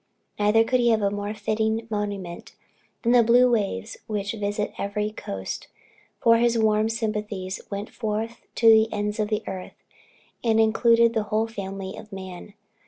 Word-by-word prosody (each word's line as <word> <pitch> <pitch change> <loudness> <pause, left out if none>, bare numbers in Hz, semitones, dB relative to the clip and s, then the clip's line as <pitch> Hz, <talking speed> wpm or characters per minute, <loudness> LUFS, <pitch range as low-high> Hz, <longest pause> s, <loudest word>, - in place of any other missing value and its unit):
Neither 210 +2 +4
could 255 +2 +1
he 240 -1 +3
have 220 -2 +2
a 200 - +2
more 205 +1 -4
fitting 220 +1 -1
monument, 200 -4 -4 0.5
than 235 - +3
the 245 -1 +7
blue 245 +2 +5
waves 200 - -1
which 205 -2 -2
visit 205 -1 -2
every 210 +1 -2
coast; 95 - -6 0.5
for 230 0 +5
his 235 0 +2
warm 215 0 +2
sympathies 210 -4 -3
went 200 +1 -5
forth 225 +1 -3
to 230 - +3
the 220 0 +6
ends 210 +1 -2
of 210 - +1
the 215 0 -1
earth, 185 -1 -8 0.6
and 225 -2 +3
included 230 +1 +4
the 220 -2 0
whole 215 +2 +1
family 195 -3 -6
of 215 0 -11
man. 190 +1 -9
215 Hz, 165 wpm, -25 LUFS, 205-225 Hz, 0.6 s, the